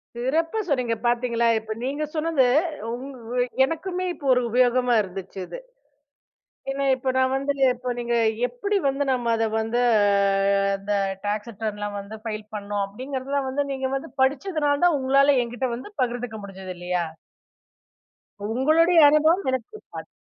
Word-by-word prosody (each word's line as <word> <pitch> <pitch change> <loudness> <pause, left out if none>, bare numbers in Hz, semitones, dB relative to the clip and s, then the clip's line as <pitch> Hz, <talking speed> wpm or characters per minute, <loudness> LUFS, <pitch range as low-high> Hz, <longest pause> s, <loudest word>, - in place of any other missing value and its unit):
சிறப்பா 320 - 0
சொன்னீங்க 250 -6 0
பார்த்தீங்களா. 240 -1 +1
இப்போ 220 0 -5
நீங்க 285 +4 -2
சொன்னது, 310 -4 +2 0.5
ம். 270 +2 -8 0.5
எனக்குமே 365 +4 -3
இப்ப 285 - -11
ஒரு 250 - +2
உபயோகமாக 245 -1 +3
இருந்துச்சி 190 -1 -8
இது. - - -8 1.1
ஏன்னா, 275 0 -1
இப்போ 260 0 -3
நான் 260 0 +3
வந்துங்க 275 0 -1
இப்போ 250 +1 -5
நீங்க 240 0 -1 0.3
எப்படி 400 - -1
வந்து 275 +1 0
நம்ம 240 -2 0
அதை 225 0 +1
வந்து 225 +2 -1 1.0
இந்த 205 +1 -3 0.3
டாக்ஸ் 210 +2 -2
ரிட்டர்ன்லாம் 205 -1 -4
வந்து 200 +2 -8
ஃபைல் 215 -2 -5
பண்ணோம் 205 0 -2
அப்படிங்கிறதுலாம் 265 +5 -4
வந்து 280 +2 0
நீங்க 265 -1 -2
வந்து 270 - -5
படிச்சதுனால 290 +1 +1
தான் 340 -4 +4
உங்களால 275 +2 +4
என்கிட்ட 245 +2 -3
வந்து 255 +10 -9
பகிர்ந்துக்க 245 -2 -2
முடிஞ்சுது. 190 -1 -8
இல்லையா? 180 0 -1 1.6
உங்களுடைய 330 +4 +5
அனுபவம் 315 +5 +3
எனக்கு 255 -3 -3
இருக்காது. - - -10
255 Hz, 135 wpm, -24 LUFS, 225-280 Hz, 1.6 s, உங்களுடைய